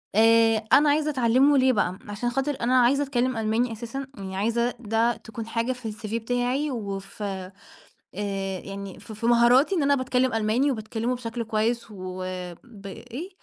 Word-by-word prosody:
آآ، 225 0 +4
أنا 295 +1 +6
عايزة 300 +1 +2
أتعلمه 265 +2 +4
ليه 260 0 +4
بقى، 185 -3 0
عشان 210 +4 -2
خاطر 270 +3 -1
أنا 250 +1 +4
عايزة 275 +4 +3
أتكلم 255 -3 0
ألماني 225 +2 0
أساسًا، 240 +5 -6
يعني 190 -1 -6
عايزة 235 +4 +1
ده 230 +1 +1
تكون 225 0 -8
حاجة 230 +2 -1
في 245 -3 -6
الCV 215 +1 -6
بتاعي، 250 +5 -1
وف 200 -3 -6
آآ 190 -2 -4 1.1
يعني 195 -1 -8
ف 205 +2 -12
في 215 +2 -6
مهاراتي 240 +8 +5
إن 320 - +1
أنا 280 0 +4
باتكلم 255 -1 +1
ألماني 225 +6 +2
وباتكلمه 225 +1 -2
بشكل 235 -1 -4
كويس 225 +2 0
وب 185 +2 -7
إيه، 250 - -8
230 Hz, 160 wpm, -25 LUFS, 215-255 Hz, 1.1 s, أنا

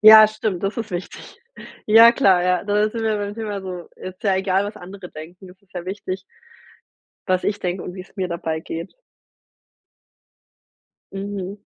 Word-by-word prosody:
Ja 215 0 +11
stimmt, 215 -4 -3
das 195 +1 -1
ist 225 -2 -4
wichtig. 180 - -7 0.5
Ja 225 +2 +9
klar, 195 -8 +4
ja, 180 0 +2
das 210 +1 +1
sind 230 - -3
wir 220 -1 +1
beim 205 0 -3
Thema 210 -3 -4
so, 180 -2 -7
ist 185 0 -9
ja 195 -3 +3
egal 190 +1 +1
was 205 +1 -6
andere 185 0 -10
denken, 175 +5 -11
es 185 +1 -19
ist 200 -2 -32
ja 175 -1 -4
wichtig 190 0 -4 1.1
was 185 -1 +2
ich 205 0 0
denke 180 0 -2
und 180 - -6
wie's 185 0 -11
mir 190 -2 -1
dabei 165 -2 -3
geht. 165 +2 -6 2.2
Mhm. 195 0 -5
195 Hz, 170 wpm, -22 LUFS, 180-210 Hz, 2.2 s, Ja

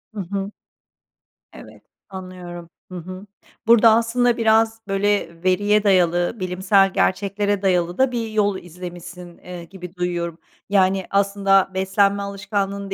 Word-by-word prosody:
Hı 205 - -3
hı. 195 +2 -4 1.0
Evet, - - -14 0.3
anlıyorum. 180 -3 -9 0.2
Hı 185 - -6
hı. 185 +3 -9 0.4
Burada 230 0 +7
aslında 235 +1 +1
biraz, 225 0 +2
böyle, 195 -4 -1
veriye 205 +3 +2
dayalı, 175 +1 +2
bilimsel 190 +1 +2
gerçeklere 200 +1 0
dayalı 180 -2 0
da 265 -1 +2
bir 235 -2 -3
yol 205 -2 0
izlemişsin, 175 0 -10
eee, 180 -1 -9
gibi 180 +1 -11
duyuyorum. 175 -2 -3 0.3
Yani 190 -1 +2
aslında 195 -1 +2
beslenme 195 +1 +1
alışkanlığını 200 0 -3
195 Hz, 120 wpm, -21 LUFS, 180-205 Hz, 1.0 s, Burada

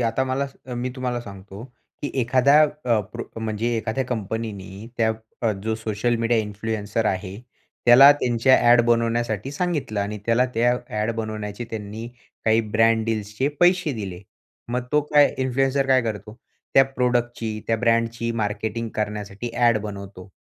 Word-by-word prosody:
आता 120 +2 +1
मला 130 +2 -1 0.3
मी 125 +1 -3
तुम्हाला 125 -2 -2
सांगतो, 100 0 -10 0.4
की 145 - -2
एखाद्या 130 +5 +5
अ, 125 -7 +1
प्रो 110 +4 -8
म्हणजे 110 +2 -1
एखाद्या 115 +4 -2
कंपनीनी 105 -3 -5
त्या 110 -1 +2 0.3
अ, 115 - +2
जो 110 0 0
सोशल 110 +2 -1
मीडिया 115 0 +1
इन्फ्लुएन्सर 105 +1 -2
आहे, 95 +1 -2 0.5
त्याला 135 +4 +9
त्यांच्या 125 -2 +3
ॲड 120 0 +7
बनवण्यासाठी 115 0 0
सांगितलं 145 - -2
आणि 105 +1 -3
त्याला 115 +2 +3
त्या 120 +2 +3 0.3
ॲड 110 +2 0
बनवण्याची 110 0 -4
त्यांनी 110 +1 -6 0.4
काही 110 +1 +4 0.2
ब्रँड 115 0 +4
डिल्स 105 -2 -3
चे 135 +2 +2
पैसे 175 -3 +4
दिले. 95 -5 -6 0.5
मग 125 +1 -2
तो 150 - +4
काय 145 -1 +5
इन्फ्लुएन्सर 135 +1 +1
काय 130 -1 +4
करतो? 105 0 -5 0.4
त्या 135 - +7
प्रॉडक्ट 125 -2 -1
ची 110 -2 -4
त्या 115 - +1
ब्रँडची 115 0 0
मार्केटिंग 110 +2 -2
करण्यासाठी 105 +1 -4
ॲड 120 -2 +3
बनवतो. 100 -2 -8
115 Hz, 150 wpm, -23 LUFS, 105-125 Hz, 0.5 s, त्याला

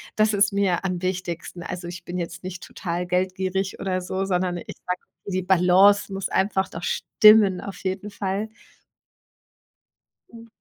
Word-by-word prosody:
Das 215 0 +3
ist 200 0 +3
mir 195 -2 +1
am 180 -2 -2
wichtigsten. 180 -2 -4
Also, 180 -1 -6
ich 175 0 -8
bin 180 +1 -4
jetzt 170 +1 -6
nicht 185 -1 -6
total 175 0 -4
geldgierig 185 +1 -1
oder 185 -1 -1
so, 190 +2 -2
sondern 180 -1 0
ich - - -8
sage, 180 0 -2 0.3
die 185 -1 -1
Balance 190 +2 +4
muss 195 0 -3
einfach 190 -1 +1
doch 165 - -8
stimmen 210 -3 +5
auf 195 - -8
jeden 190 +2 -3
Fall. 200 +1 -2 1.9
Mhm. 230 0 -12
185 Hz, 155 wpm, -24 LUFS, 180-195 Hz, 1.9 s, stimmen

